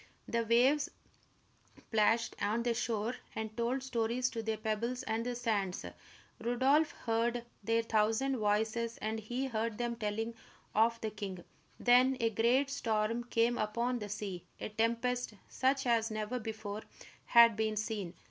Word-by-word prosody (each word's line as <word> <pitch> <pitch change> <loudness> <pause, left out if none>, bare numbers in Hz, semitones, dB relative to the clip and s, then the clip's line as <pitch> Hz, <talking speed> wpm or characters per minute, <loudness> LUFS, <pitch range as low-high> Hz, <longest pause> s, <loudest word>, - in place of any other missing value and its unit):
The 235 0 0
waves 255 +6 +4 1.0
plashed 225 +1 +3
on 215 +3 +1
the 240 -1 +1
shore 230 0 -1 0.2
and 220 0 -4
told 245 +3 -1
stories 245 0 0
to 230 - -3
the 220 0 -2
pebbles 225 +3 -2
and 225 +1 -1
the 245 0 -2
sands. 210 -6 -1 0.6
Rodolph 265 +6 +3
heard 235 +1 0 0.2
their 230 +2 +2
thousand 225 +5 +1
voices, 220 +2 0
and 220 +1 -2
he 245 +5 -3
heard 225 -3 -2
them 240 -1 -1
telling 225 +1 -2 0.4
of 230 +2 +3
the 220 - -2
king. 195 -4 -6 0.4
Then 250 +2 +5
a 230 -1 +2
great 245 +6 +2
storm 225 -1 0
came 240 0 +1
upon 235 +4 0
the 210 -1 -6
sea, 200 -4 -4 0.2
a - - -4
tempest 230 +2 0
such 270 +1 +1
as 230 -2 +2
never 215 +3 -3
before 215 -2 -5 0.4
had 235 -2 +7
been 220 0 0
seen. 205 -4 -3
230 Hz, 150 wpm, -33 LUFS, 215-240 Hz, 1.0 s, had